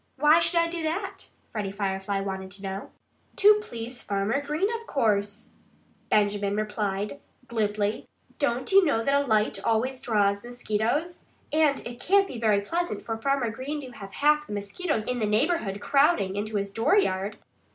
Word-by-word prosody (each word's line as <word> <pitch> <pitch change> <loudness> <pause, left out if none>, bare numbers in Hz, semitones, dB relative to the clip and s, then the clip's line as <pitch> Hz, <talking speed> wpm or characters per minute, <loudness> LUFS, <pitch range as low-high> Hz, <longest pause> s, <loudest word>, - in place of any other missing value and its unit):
"Why 300 +4 +5
should 335 +1 +2
I 335 - +3
do 335 0 -4
that?" 345 +5 -3 0.2
Freddie 205 -3 -3
Firefly 195 0 -2
wanted 190 -1 -4
to 200 +1 -11
know. 195 +1 -5 0.5
"To 420 +1 +6
please 240 - -6
Farmer 200 +7 -1
Green, 300 +7 0
of 460 - -16
course," 205 -4 0 0.6
Benjamin 205 -1 +2
replied 210 +2 -2 0.3
glibly. 210 -2 -1 0.3
"Don't 260 0 0
you 390 0 +7
know 255 -9 +1
that 275 - +1
a 280 0 +3
light 215 -2 +1
always 250 +4 0
draws 200 -3 +1
mosquitoes? 245 +7 -2 0.3
And 305 -3 +2
it 240 0 -7
can't 390 +5 +3
be 245 - -7
very 215 -3 +3
pleasant 345 +11 -2
for 225 - -3
Farmer 255 0 0
Green 270 +6 -4
to 260 -2 -9
have 195 -4 -10
half 300 +1 +3
the - - -6
mosquitoes 215 - -2
in 250 0 -2
the 215 - 0
neighborhood 215 - +1
crowding 275 - +2
into 210 +1 -3
his 200 -1 -1
dooryard." 205 - +1
225 Hz, 165 wpm, -26 LUFS, 205-295 Hz, 0.6 s, you